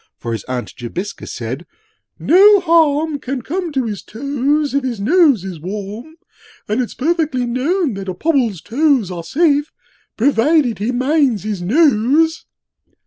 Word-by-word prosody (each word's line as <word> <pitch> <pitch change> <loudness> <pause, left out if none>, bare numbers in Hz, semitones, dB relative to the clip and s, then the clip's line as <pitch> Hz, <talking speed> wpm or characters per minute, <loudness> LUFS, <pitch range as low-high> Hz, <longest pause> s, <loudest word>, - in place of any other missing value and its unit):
For 115 - -6
his 115 -4 -4
Aunt 125 -1 -5
Jobiska 155 - -6
said, 125 +8 -6 0.5
'No 400 +5 +6
harm 320 -3 +2
'Can 255 -1 -5
come 350 +4 -3
to 265 -2 0
his 210 -3 -4
toes 280 +4 -1
if 280 -1 0
his 245 -5 -3
nose 285 - +3
is 180 -4 -7
warm; 205 - -7 0.5
'And 215 +5 0
it's 245 - -5
perfectly 310 -4 0
known 275 - 0
that 195 -1 -6
a 185 - -4
Pobble's 235 - 0
toes 265 - +1
'Are 170 -2 -6
safe, 295 - +1 0.5
provided 260 -1 +2
he 215 +4 -1
minds 260 - +1
his 210 -4 -4
nose.' 290 - +2
255 Hz, 145 wpm, -17 LUFS, 205-310 Hz, 0.5 s, No